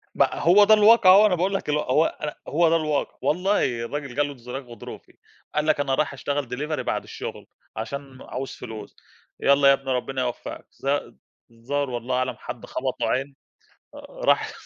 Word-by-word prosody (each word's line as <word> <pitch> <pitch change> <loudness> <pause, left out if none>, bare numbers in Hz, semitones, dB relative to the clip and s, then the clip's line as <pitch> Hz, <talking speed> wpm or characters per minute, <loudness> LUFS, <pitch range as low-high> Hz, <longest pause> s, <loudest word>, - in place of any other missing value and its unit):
ما - - +2
هو 190 +5 +5
ده 215 - +6
الواقع 215 -2 +7
أهو، 200 +3 +8
أنا 185 -4 +3
باقول 185 +3 0
لك 195 - -3
اللي 150 0 +2
هو 150 +5 +2
أنا 150 -1 -4
هو 165 +2 +3
ده 165 - +3
الواقع، 155 -3 -1
والله 150 - +1
الراجل 140 -1 -5
جا 145 - +2
له 145 - -4
انزلاق 125 +2 -7
غضروفي، 120 -3 -11 0.4
قال 150 0 +1
لك 155 -2 +2
أنا 135 -2 +1
رايح 150 -1 0
أشتغل 140 -1 -3
Delivery 150 +5 -3
بعد - - -2
الشغل - - -8 0.3
عشان 135 +3 -6
عاوز 130 +1 -6
فلوس 110 -2 -9 0.4
يالّا 140 0 +4
يا 140 - +8
ابني 135 -1 -3
ربنا 130 +1 -2
يوفقك 120 -1 -5 0.2
الظ 140 +1 -1 0.4
الظاهر 135 +4 -3
والله 120 +1 -3
أعلم 130 -2 -1
حد - - -8
خبطه - - -3
عين 135 +1 -2 0.6
آآ، - - -9 0.2
راح - - +3
140 Hz, 185 wpm, -24 LUFS, 130-155 Hz, 0.6 s, أهو